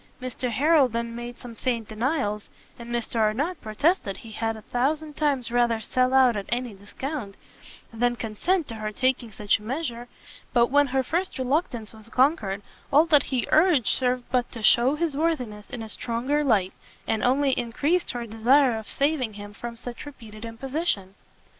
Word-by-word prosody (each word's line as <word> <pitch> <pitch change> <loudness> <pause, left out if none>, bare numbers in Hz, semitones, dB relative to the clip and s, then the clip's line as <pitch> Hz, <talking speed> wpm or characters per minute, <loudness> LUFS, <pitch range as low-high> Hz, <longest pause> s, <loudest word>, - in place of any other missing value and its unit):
Mr 255 0 -3
Harrel 290 +4 +4
then 230 0 -3
made 240 0 -7
some 240 -1 -10
faint 230 -2 -2
denials, 215 -2 -1 0.3
and 235 0 -9
Mr 235 -1 -2
Arnott 265 +11 0
protested 215 - 0
he 225 - -11
had 225 +1 -2
a 215 - -12
thousand 295 +6 -1
times 275 -6 +1
rather 240 -2 +2
sell 255 +4 +1
out 255 -3 +6
at 200 -1 -4
any 240 -1 -2
discount, 205 +2 -6 0.6
than 240 +1 +1
consent 260 - -1
to - - -6
her 215 -1 -4
taking 255 0 0
such 205 0 +1
a - - -16
measure; 245 0 -4 0.5
but, 240 0 +4
when 290 0 +5
her 265 0 +1
first 350 +8 -2
reluctance 255 - -1
was 220 +1 -11
conquered, 230 -7 +1 0.3
all 300 +3 +6
that 300 -4 +5
he 255 -3 0
urged 310 - +5
served 250 -1 +1
but 250 -2 +1
to 230 -3 -7
shew 245 +6 +5
his 315 -2 -1
worthiness 255 -10 -2
in 245 -4 -6
a 220 - -8
stronger 250 +7 -1
light, 205 -9 +2 0.3
and 220 - -1
only 270 +2 +3
increased 285 +9 0
her 240 -1 -3
desire 235 +2 +3
of 220 - -10
saving 275 -6 0
him 205 0 -9
from 235 +2 -7
such 240 +3 -8
repeated 220 -6 -11
imposition. 230 - -2
245 Hz, 175 wpm, -25 LUFS, 225-280 Hz, 0.6 s, out